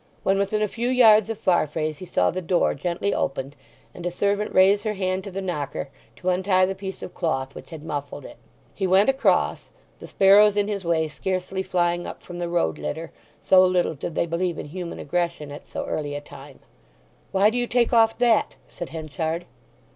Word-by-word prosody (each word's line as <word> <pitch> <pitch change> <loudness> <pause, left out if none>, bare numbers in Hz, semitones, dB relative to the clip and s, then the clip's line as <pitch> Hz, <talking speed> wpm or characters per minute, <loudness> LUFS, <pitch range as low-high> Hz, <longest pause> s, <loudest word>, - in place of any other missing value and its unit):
When 195 +1 +2
within 210 +2 0
a - - +1
few 235 +4 -3
yards 225 -4 +6
of 225 - -3
Farfrae's 155 -4 0
he 185 - -8
saw - - +2
the 185 - -4
door 175 0 +1
gently 175 +7 -2
opened, 135 +1 -2 0.4
and 175 - -10
a 175 - 0
servant 200 +4 -1
raise 195 +2 +5
her 215 -1 -2
hand 185 -1 -1
to - - -5
the 195 +1 -5
knocker, 150 -6 -4 0.3
to 185 - -3
untie 185 0 +3
the 190 - -2
piece 190 0 -7
of - - -8
cloth 135 -6 -2
which - - -11
had 160 -3 -9
muffled 145 -2 -5
it. - - -11 0.4
He 195 - -1
went 190 +6 +4
across, 270 0 +1 0.3
the - - -10
sparrows 205 +1 +5
in 205 0 +2
his 200 -2 -3
way 165 -2 +1
scarcely 185 +4 -3
flying 175 -2 0
up - - -9
from 175 -1 -8
the 175 -1 -3
road 80 - 0
litter, 160 - -5 0.3
so 185 0 +6
little 180 -2 +2
did 155 +2 -6
they - - +1
believe 170 +1 -2
in - - -7
human 175 +1 -6
aggression 170 -1 -2
at 145 - -10
so - - -5
early 145 -2 -3
a - - -3
time. 145 -1 -13 0.7
"Why 200 +3 +4
do 245 - -1
you 245 - -1
take 240 0 +1
off 225 -1 +4
that?" 240 -3 +2
said 175 - -7
Henchard. 160 +2 -4
180 Hz, 205 wpm, -24 LUFS, 160-200 Hz, 0.7 s, yards